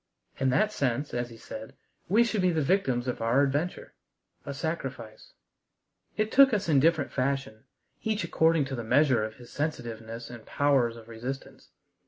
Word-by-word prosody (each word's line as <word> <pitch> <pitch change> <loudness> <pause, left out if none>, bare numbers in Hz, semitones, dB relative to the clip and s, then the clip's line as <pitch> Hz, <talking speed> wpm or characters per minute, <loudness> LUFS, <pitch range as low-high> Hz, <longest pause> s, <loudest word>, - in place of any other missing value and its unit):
In 135 0 +2
that 150 +12 +2
sense, 140 - -1
as 120 0 -2
he 115 - -12
said, 110 0 -9 0.3
we 220 +5 +5
should 225 -4 0
be 185 - +3
the 160 -3 +1
victims 135 -8 +1
of 125 - -3
our 120 +5 +3
adventure 145 +6 -2 0.5
a - - -2
sacrifice. 135 -7 -5 0.8
It 215 +1 0
took 270 -3 +7
us 200 - -2
in 150 -4 +4
different 160 0 +2
fashion, 135 -4 -2 0.4
each 215 -3 -1
according 160 -2 +2
to 135 0 -4
the 120 - -4
measure 130 -1 +3
of 110 0 -5
his 120 -1 -14
sensitiveness 115 -6 -4
and 120 -2 -10
powers 135 -5 +2
of 115 -1 -13
resistance. 125 +4 -7
135 Hz, 170 wpm, -28 LUFS, 120-160 Hz, 0.8 s, took